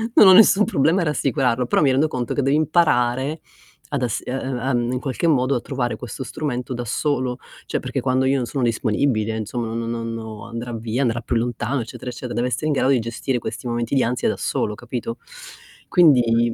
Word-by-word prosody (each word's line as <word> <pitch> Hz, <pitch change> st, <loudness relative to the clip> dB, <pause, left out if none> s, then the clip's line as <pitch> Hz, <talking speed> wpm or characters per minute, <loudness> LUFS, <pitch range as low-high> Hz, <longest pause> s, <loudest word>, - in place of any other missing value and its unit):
Non 205 Hz, -, +8 dB
ho 190 Hz, -, +9 dB
nessun 210 Hz, 0 st, +7 dB
problema 165 Hz, -1 st, +2 dB
a -, -, 0 dB
rassicurarlo, 135 Hz, -5 st, +1 dB
però -, -, +2 dB
mi 140 Hz, -3 st, +4 dB
rendo 140 Hz, +4 st, +3 dB
conto 125 Hz, -4 st, -3 dB
che -, -, 0 dB
devi 135 Hz, +2 st, +2 dB
imparare 145 Hz, -3 st, +2 dB, 0.5 s
ad 140 Hz, -3 st, -2 dB
ass 120 Hz, -3 st, -1 dB
e -, -, -4 dB
e 130 Hz, -, -1 dB
ehm, 125 Hz, -2 st, -1 dB
in 125 Hz, -, -1 dB
qualche 135 Hz, +5 st, -2 dB
modo 135 Hz, -3 st, +2 dB
a 120 Hz, -, -1 dB
trovare 120 Hz, -4 st, -2 dB
questo 125 Hz, +3 st, -6 dB
strumento 125 Hz, -2 st, -4 dB
da 120 Hz, 0 st, -4 dB
solo, 130 Hz, 0 st, -1 dB, 0.3 s
cioè -, -, -2 dB
perché -, -, -3 dB
quando 130 Hz, 0 st, +1 dB
io 135 Hz, +1 st, +2 dB
non 125 Hz, -, -1 dB
sono 130 Hz, +2 st, -3 dB
disponibile 110 Hz, -1 st, 0 dB
insomma 115 Hz, +1 st, -4 dB
no 115 Hz, 0 st, -3 dB
no 115 Hz, 0 st, -3 dB
non 110 Hz, -2 st, -6 dB
andrà 115 Hz, +1 st, -5 dB
via, 115 Hz, +2 st, -2 dB
andrà 115 Hz, -2 st, 0 dB
più 120 Hz, -, -2 dB
lontano 120 Hz, +2 st, -1 dB
eccetera 115 Hz, +2 st, -7 dB
eccetera, 125 Hz, 0 st, -6 dB
deve 120 Hz, +1 st, 0 dB
essere 140 Hz, +5 st, -2 dB
in 155 Hz, -, +2 dB
grado 135 Hz, -1 st, +2 dB
di 135 Hz, -3 st, +4 dB
gestire 120 Hz, +3 st, -2 dB
questi 125 Hz, -, -6 dB
momenti 120 Hz, +2 st, -1 dB
di 135 Hz, -, +3 dB
ansia 125 Hz, +2 st, 0 dB
da -, -, -2 dB
solo 105 Hz, -, -1 dB
capito? 120 Hz, 0 st, -5 dB, 0.7 s
Quindi 120 Hz, -8 st, +4 dB
125 Hz, 215 wpm, -22 LUFS, 115-135 Hz, 0.7 s, ho